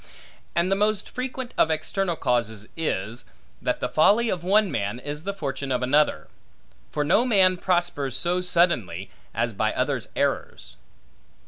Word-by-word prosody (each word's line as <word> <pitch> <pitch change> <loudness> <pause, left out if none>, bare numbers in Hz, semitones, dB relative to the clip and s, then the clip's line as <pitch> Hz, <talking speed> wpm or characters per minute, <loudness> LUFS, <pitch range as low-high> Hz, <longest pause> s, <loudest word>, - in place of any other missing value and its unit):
And 170 +3 +1
the - - +4
most 210 0 +1
frequent 255 0 -5
of - - +5
external 175 +3 -1
causes 115 -6 -1
is, 115 -8 -3 0.4
that - - -1
the - - 0
folly 215 +9 +4
of 175 -2 -3
one 200 +1 +3
man, 105 -3 -2
is 145 +5 -6
the 200 - -1
fortune 140 -6 -4
of 125 0 0
another. 135 - +2 0.6
For 150 - 0
no 210 +10 +4
man 195 -7 +4
prospers 175 -7 0
so 180 +1 +1
suddenly, 120 - +1 0.2
as 115 +1 0
by 110 +2 0
others' 130 -3 -1
errors. - - -2
155 Hz, 150 wpm, -25 LUFS, 125-190 Hz, 0.6 s, of